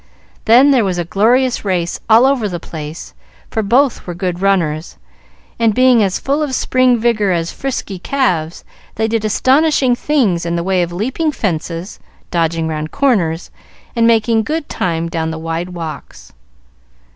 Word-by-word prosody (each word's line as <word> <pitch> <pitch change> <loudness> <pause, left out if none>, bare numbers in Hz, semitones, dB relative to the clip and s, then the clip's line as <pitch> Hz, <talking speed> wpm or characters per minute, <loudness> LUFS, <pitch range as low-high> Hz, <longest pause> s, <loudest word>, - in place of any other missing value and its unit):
Then 250 +6 +6
there 255 -4 +3
was 185 -3 -1
a 175 - -2
glorious 240 +8 +2
race 180 -4 -1
all 225 +3 +6
over 260 -6 +1
the 175 -2 -4
place; 155 -1 -8 0.4
for 220 - 0
both 245 +4 +1
were 175 - -5
good 180 -1 -3
runners, 170 -5 0 0.6
and, 225 -3 +2
being 255 -2 +5
as 195 -3 +1
full 280 +3 -1
of 285 -4 -1
spring 255 -1 +2
vigor 220 -4 +1
as 170 -1 -1
frisky 240 -8 -5
calves, 175 - -1 0.3
they 220 +1 0
did 225 -1 -1
astonishing 265 +4 +2
things 240 - 0
in 170 0 -2
the 170 - -1
way 185 0 +1
of 175 0 -2
leaping 260 - -1
fences, 170 - -4 0.3
dodging 165 -1 0
round 155 -1 -3
corners, 180 - 0 0.4
and 230 -1 +3
making 225 0 +3
good 305 +6 -3
time 165 -1 -2
down 165 -1 -2
the 160 - -5
wide 165 +2 -4
walks. 160 - -8
200 Hz, 160 wpm, -16 LUFS, 170-250 Hz, 0.6 s, Then